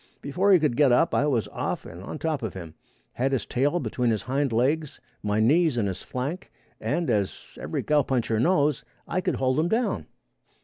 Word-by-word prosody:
Before 185 +8 +1
he 190 - +8
could 150 -7 +1
get 145 -4 +5
up 145 +7 +3
I 145 - +2
was 120 -7 +1
off - - -3
and 85 +2 -9
on 100 - -6
top 155 -3 -2
of 110 -5 -4
him, 85 -4 -8 0.4
had 135 +2 0
his 135 - 0
tail 145 +7 +1
between 125 -7 -1
his 110 -2 0
hind 135 +1 0
legs, 140 +6 0 0.2
my 105 +1 0
knees 150 +4 +3
in 110 - +1
his 95 -2 -3
flank, 145 +9 -5 0.3
and, 170 +2 -1
as 105 -5 -2
every - - -3
cowpuncher 130 -7 +1
knows, 145 -3 +2 0.2
I 185 - -1
could - - 0
hold 130 +2 +1
him 160 - +2
down. 235 +4 0
135 Hz, 195 wpm, -26 LUFS, 115-155 Hz, 0.4 s, he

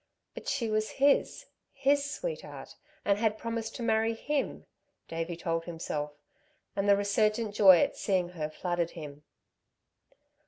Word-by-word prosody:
But - - -9
she 255 -5 0
was 215 0 0
his, 280 +1 +3 0.3
his 280 +1 +2
sweetheart, 485 +11 -6 0.3
and 200 0 +3
had 220 -1 +1
promised 230 0 -4
to 245 - -5
marry 225 0 +2
him, 290 +4 -2 0.4
Davey 165 +1 -3
told 165 -1 -2
himself, 155 -3 -4 0.6
and 200 0 +1
the 200 - +7
resurgent 210 +2 +1
joy 190 -3 +8
at - - +1
seeing 185 -3 0
her 160 -4 -4
flooded 175 +1 -1
him. 150 -2 -8
205 Hz, 140 wpm, -30 LUFS, 175-230 Hz, 0.6 s, joy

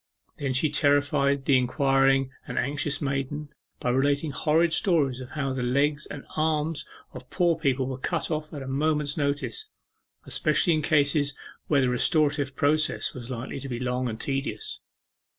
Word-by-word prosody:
Then 135 -2 -1
she 145 +3 +2
terrified 140 -1 +2
the 135 -2 +5
inquiring 135 +1 +2 0.2
and - - -5
anxious 145 +2 -1
maiden 140 +2 -2 0.3
by 125 - 0
relating 140 +4 +1
horrid 160 +5 +2
stories 145 - +2
of 130 -1 -8
how 135 -3 -1
the 130 - -3
legs 145 +4 +1
and 140 - -8
arms 155 0 0 0.3
of 125 0 -10
poor 175 -2 +2
people 135 -5 0
were 130 0 -5
cut 135 - -2
off 155 0 -3
at 145 -3 -6
a - - -8
moment's 150 +1 0
notice, 145 - -2 0.6
especially 175 - +2
in 155 - +1
cases 145 -2 +2 0.3
where 145 -3 +3
the 130 - +2
restorative 145 +1 +1
treatment 155 +3 +1
was 120 -1 -8
likely 130 +2 -5
to 135 - -7
be 120 -2 -3
long 125 0 -1
and 110 0 -6
tedious. 140 - -3
140 Hz, 165 wpm, -26 LUFS, 135-150 Hz, 0.6 s, the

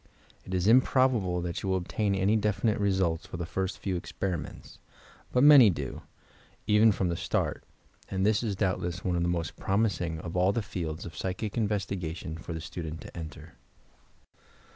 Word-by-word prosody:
It 95 - -4
is 90 0 0
improbable 120 -6 +3
that 85 -1 -3
you 95 - -3
will 95 - +2
obtain 100 +3 -1
any 95 +3 +2
definite 105 0 +1
results 95 -5 0
for - - -7
the 85 - -3
first 95 +2 -3
few 90 -3 -3
experi 90 -4 -3
ments, - - -11 0.3
— - - -25
but 125 - +3
many 145 -6 +9
do, 70 -7 -4 0.6
even 105 +1 +5
from 95 -2 -1
the 85 - -1
start, 85 -2 -1 0.5
and 95 0 0
this 105 -1 +3
is 110 -5 -2
doubtless 95 -2 -2
one 90 -2 +1
of 85 - 0
the 85 - +1
most 85 -4 -2
promising 95 -5 0
of 85 +1 -6
all 90 +2 +3
the 115 - -1
fields 80 -5 -5
of 80 - -8
psychic 95 +6 -3
investigation 95 -6 -2
for 85 +1 -8
the 80 -1 -4
student 80 0 -6
to - - -11
enter. 80 -1 -9
95 Hz, 185 wpm, -29 LUFS, 85-105 Hz, 0.6 s, many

